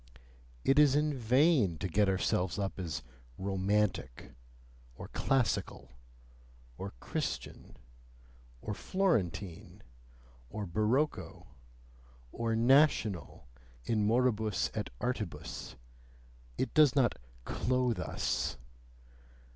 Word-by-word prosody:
It 135 +2 +4
is 145 -2 +6
in 150 0 +2
vain 125 - +3
to 95 - -3
get 100 +3 +2
ourselves 90 -1 0
up 100 -1 -3
as 80 -6 -4 0.3
romantic, 95 -8 -1 0.6
or - - -9
classical, 130 -5 -1 0.8
or - - -6
Christian, - - -5 0.9
or 105 - -3
Florentine, 100 - -1 0.7
or 105 +6 -4
barocco, 110 - -1 0.9
or 115 -1 -1
"national," 115 - +2 0.4
in 110 -2 +1
moribus 110 -3 +1
et - - -3
artibus: 110 - -4 0.8
it - - -1
does 150 -3 +5
not 130 -5 +3 0.3
"clothe 125 -2 0
us"! - - -2
110 Hz, 90 wpm, -32 LUFS, 95-130 Hz, 0.9 s, is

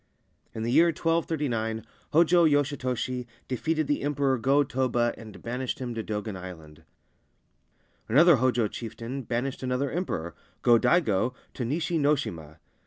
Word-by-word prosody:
In 110 - -3
the 115 - -1
year 165 +6 +6
1239 145 -9 -1 0.3
^°j° 170 +1 +5
Yoshitoshi 130 -3 -1 0.2
defeated 155 +5 -1
the 145 - 0
Emperor 140 -2 +1
Go 140 +5 +3
Toba 125 -3 0
and 110 -3 -12
banished 125 +2 -3
him 125 -2 -4
to 115 -1 -4
Dogen 105 -1 -4
Island. 80 -5 -10 1.3
Another 155 +6 +6
Hojo 125 -2 +2
chieftain 115 +4 -6
banished 125 +2 -3
another 130 +1 -1
Emperor, 85 - -3 0.3
Go 120 -1 +6
Daigo, 125 - +2 0.2
to 125 - -4
Nishi 160 +6 -1
no 145 +1 +4
shima. 80 - -6
125 Hz, 135 wpm, -27 LUFS, 115-145 Hz, 1.3 s, year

